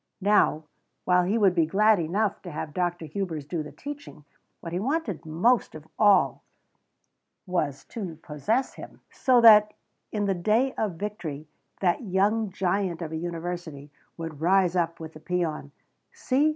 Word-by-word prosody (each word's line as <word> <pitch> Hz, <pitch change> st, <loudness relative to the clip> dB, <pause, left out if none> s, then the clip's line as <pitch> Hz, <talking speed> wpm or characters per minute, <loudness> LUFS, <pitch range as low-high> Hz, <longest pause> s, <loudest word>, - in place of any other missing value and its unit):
Now, 200 Hz, -5 st, +3 dB, 0.4 s
while 180 Hz, 0 st, +3 dB
he 205 Hz, +5 st, +1 dB
would 200 Hz, -5 st, +4 dB
be 165 Hz, -3 st, +2 dB
glad 210 Hz, +3 st, +4 dB
enough 195 Hz, +6 st, -1 dB
to 180 Hz, -, -8 dB
have 150 Hz, 0 st, -5 dB
Dr. 175 Hz, -1 st, -2 dB
Hubers 160 Hz, -2 st, -4 dB
do 165 Hz, +2 st, -3 dB
the 150 Hz, -, -8 dB
teaching, 290 Hz, -, -9 dB, 0.3 s
what 165 Hz, -1 st, -7 dB
he 175 Hz, -, -1 dB
wanted 225 Hz, -, -2 dB
most 205 Hz, +10 st, +1 dB
of 155 Hz, 0 st, -11 dB
all 205 Hz, -3 st, +4 dB, 1.0 s
was 155 Hz, -7 st, -2 dB
to 190 Hz, -8 st, -6 dB
possess 215 Hz, -, -1 dB
him, -, -, -12 dB
so 255 Hz, -3 st, +3 dB
that 210 Hz, -2 st, +7 dB, 0.4 s
in 210 Hz, -1 st, -1 dB
the 195 Hz, -, +1 dB
day 220 Hz, +9 st, +1 dB
of 205 Hz, -6 st, -2 dB
victory 165 Hz, -6 st, -6 dB, 0.3 s
that 175 Hz, -3 st, +2 dB
young 210 Hz, +1 st, +1 dB
giant 185 Hz, -2 st, -1 dB
of 160 Hz, -, -6 dB
a -, -, -4 dB
university 165 Hz, -3 st, -5 dB, 0.3 s
would 165 Hz, -3 st, -7 dB
rise 185 Hz, +1 st, +3 dB
up 170 Hz, -1 st, 0 dB
with 160 Hz, -1 st, -8 dB
the 155 Hz, -, -11 dB
peon: 160 Hz, -4 st, -3 dB, 0.4 s
"See! 280 Hz, +4 st, +1 dB
180 Hz, 160 wpm, -26 LUFS, 160-210 Hz, 1.0 s, that